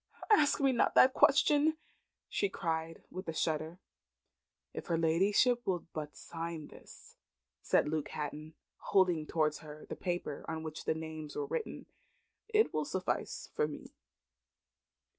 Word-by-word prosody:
"Ask 300 -9 +5
me 275 -1 +4
not 240 - +2
that 260 0 +7
question!" 295 +3 +4 0.5
she 200 - 0
cried, 165 -2 -3
with 185 +1 -7
a 165 - -2
shudder. 160 +1 -1 1.0
"If - - -6
her 170 - +1
ladyship 195 +9 +3
will 180 -3 0
but 150 -1 -5
sign 165 -2 -6
this," - - -15 0.4
said - - +2
Luke 155 -1 -2
Hatton, 155 +1 -5 0.2
holding 180 -5 +2
towards 155 -2 +1
her 150 0 -11
the - - -6
paper 175 -5 -3
on 160 0 -4
which 155 -1 -6
the - - +1
names 155 -1 -6
were - - -1
written, 460 +1 -4 0.6
"it 435 0 +3
will 155 - +1
suffice 185 +3 -3
for 150 - +1
me." 150 - -9
165 Hz, 140 wpm, -33 LUFS, 155-200 Hz, 1.0 s, that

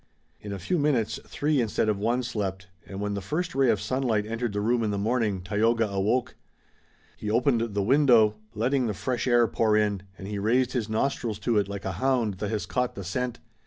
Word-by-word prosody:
In 105 - -8
a 100 - -3
few 100 - -1
minutes 140 -7 +1
three 145 -2 +1
instead 110 -1 0
of 105 -2 0
one 120 +4 0
slept, 100 -6 -3 0.2
and 95 - -7
when 105 0 -2
the 100 - -3
first 160 - -2
ray 135 -2 +3
of 110 -3 +2
sunlight 110 -1 0
entered 115 +1 -2
the 105 - -2
room 115 +3 +1
in 110 - 0
the 100 - -1
morning 105 -3 0
Tayoga 110 +4 +2
awoke. 105 +6 0 0.8
He 105 - -4
opened 115 -1 +1
the 100 - +1
window, 120 -3 +5 0.2
letting 125 +3 +1
the 105 - -2
fresh 130 +3 -2
air 120 -1 +5
pour 110 -2 +2
in, 105 -3 +1 0.2
and 95 - -8
he 105 -1 -3
raised 125 +5 +2
his 115 -4 -2
nostrils 110 -1 -1
to 110 0 +2
it 100 - -1
like 100 0 -6
a 95 - -1
hound 120 -8 +1
that 105 - -2
has 110 -2 -2
caught 125 -1 -1
the 100 - -6
scent. 125 +7 -3
110 Hz, 215 wpm, -27 LUFS, 105-125 Hz, 0.8 s, window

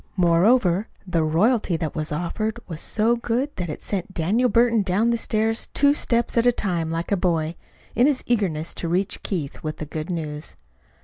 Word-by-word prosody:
Moreover, 180 +3 +3 0.2
the 175 -3 0
royalty 185 +4 +2
they 160 - -2
offered 170 +9 -3
was 160 -3 -6
so 225 +2 +2
good 240 +4 -2
that 180 -2 -3
it 150 - -6
sent 190 -1 -3
Daniel 215 +10 +2
Burton 235 -2 +3
down 205 +5 +1
the - - +2
stairs 225 0 0
two 285 0 +5
steps 235 -5 0
at 235 - +3
a - - +7
time 175 -8 -1
like 165 +3 -3
a - - +4
boy, 170 -4 0 0.4
in 245 +4 +4
his 285 -3 +1
eagerness 175 -9 0
to 170 - -4
reach 185 +4 0
Keith 160 -8 -4
with 155 -1 -4
the 155 - -5
good 155 +3 -5
news. 155 -3 -4
190 Hz, 185 wpm, -23 LUFS, 165-230 Hz, 0.4 s, a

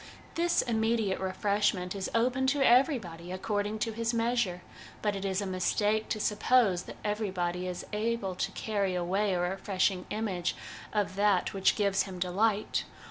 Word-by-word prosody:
This 345 +1 +2
immediate 225 -3 0
refreshment 190 -1 0
is 195 -2 -3
open 255 +3 +2
to 275 0 +3
everybody 225 - +2
according 205 +2 -2
to 225 - -3
his 230 +1 -1
measure; 230 -6 0 0.4
but 210 -1 +1
it 195 - -4
is 195 0 0
a - - -2
mistake 205 +3 0
to 215 - -1
suppose 210 -3 +2
that - - -9
everybody 185 -4 -1
is 180 -1 -5
able 215 -2 -1
to 180 - -2
carry 200 -4 -1
away 190 +3 0
a - - 0
refreshing 185 0 0
image 195 -5 -2 0.4
of 205 -4 -1
that 200 -3 +2
which 195 -1 +3
gives 200 -2 +2
him 190 -2 -5
delight. 200 +4 +1
205 Hz, 155 wpm, -30 LUFS, 185-225 Hz, 0.4 s, to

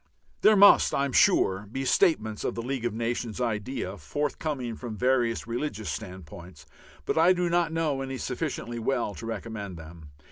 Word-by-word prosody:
There 215 - +6
must, 200 0 +6
I 140 - +1
am 140 - -3
sure, 95 -4 +3
be 135 +2 -3
statements 110 - +2
of - - -2
the 115 - -4
League 130 -1 -3
of 120 - -1
Nations 115 -1 -3
idea 110 -3 -3
forthcoming 135 - -3
from 115 -2 -7
various 125 -2 +1
religious 115 -3 -3
standpoints, 90 -5 -9 0.4
but - - 0
I 175 +3 +6
do 175 -1 -1
not 175 -2 +2
know 155 -4 -1
any 135 0 -4
sufficiently 125 -3 -4
well 120 -2 -1
to 115 - -8
recommend 105 -5 -6
them. 80 -1 -12
120 Hz, 170 wpm, -27 LUFS, 105-140 Hz, 0.4 s, There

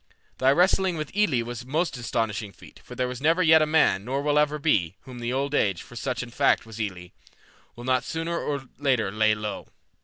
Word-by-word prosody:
Thy 130 - +4
wrestling 180 +2 +3
with 155 +3 -6
Elli 160 - +2
was 120 0 -6
also 125 - -14
a - - -11
most 165 0 0
astonishing 115 -3 -2
feat, - - -16
for - - -11
there 125 - 0
was 125 0 -6
never 165 +5 +3
yet 160 -1 +6
a 155 - +2
man, 150 -11 +3
nor 135 +5 -2
ever 150 0 +2
will - - -5
be, 95 - +1
whom 125 -2 -10
Old 140 +2 -1
Age, 100 -10 +1
for 120 - -14
such 125 +1 -3
in 120 - -10
fact - - +2
was 110 0 -10
Elli, 90 -5 -5 0.6
will 120 - -10
not 130 0 +1
sooner 165 +4 -3
or 140 -2 -3 0.2
later 130 -8 +1
lay 110 +1 +2
low. 105 -1 -5
130 Hz, 220 wpm, -25 LUFS, 110-150 Hz, 0.6 s, yet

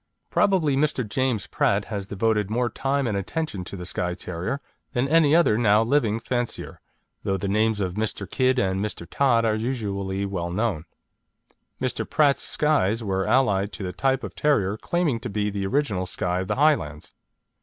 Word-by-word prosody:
Probably 170 -8 +3
Mr. 140 -4 0
James 125 -2 0
Pratt 100 +1 +1
has 100 -3 -5
devoted 105 0 0
more 120 +2 0
time 140 0 0
and 110 -4 -1
attention 100 - -3
to 100 - -7
the 90 - -6
Skye 90 0 -2
Terrier 90 +9 -4 0.3
than 125 0 +1
any 155 0 +5
other 135 -10 +4
now 110 -1 +4
living 115 -3 +1
fancier, 120 0 -4 0.4
though 95 0 -1
the 100 - -3
names 110 +2 +1
of 95 -3 -1
Mr. 105 -1 -3
Kidd 130 +6 +1
and 95 -3 +1
Mr. 95 -5 -5
Todd 120 0 +2
are 110 - +2
usually 100 -4 -2
well 90 -3 -3
known. 90 -4 -1 0.9
Mr. - - -1
Pratt's 145 -3 +3
Skyes 120 -8 +1
were 95 -2 -1
allied 105 -6 +2
to 100 - -6
the 90 -1 -4
type 135 -1 0
of - - -6
terrier 105 -10 +1
claiming 155 0 0
to 120 +1 -5
be 105 0 -1
the 100 -1 -2
original 105 -8 0
Skye 90 0 -1
of 95 - -3
the - - 0
Highlands. 105 - +1
110 Hz, 175 wpm, -24 LUFS, 95-130 Hz, 0.9 s, any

